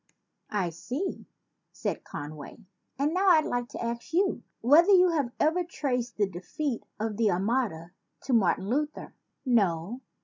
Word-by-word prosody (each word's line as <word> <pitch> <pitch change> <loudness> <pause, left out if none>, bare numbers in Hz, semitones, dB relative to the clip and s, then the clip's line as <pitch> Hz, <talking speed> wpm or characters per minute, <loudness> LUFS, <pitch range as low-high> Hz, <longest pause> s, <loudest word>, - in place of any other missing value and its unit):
"I 190 -5 -1
see," 250 - -4 0.4
said - - -4
Conway, 145 0 -8 0.4
"and 290 +4 +1
now 380 +2 +2
I'd 315 -4 +6
like 245 0 -2
to - - -6
ask 235 +5 -4
you 380 +3 +2 0.2
whether 300 - +6
you 365 -2 +7
have 285 -7 0
ever 330 +4 +2
traced 250 -8 -3
the 210 - +3
de 175 -2 -8
feat 270 +5 -3 0.2
of 215 -1 -2
the 225 -2 +3
Armada 195 -3 -1 0.3
to 260 - -1
Martin 190 -4 +2
Luther? 295 +6 -2 0.3
No? 205 -1 +1
240 Hz, 150 wpm, -28 LUFS, 195-300 Hz, 0.4 s, you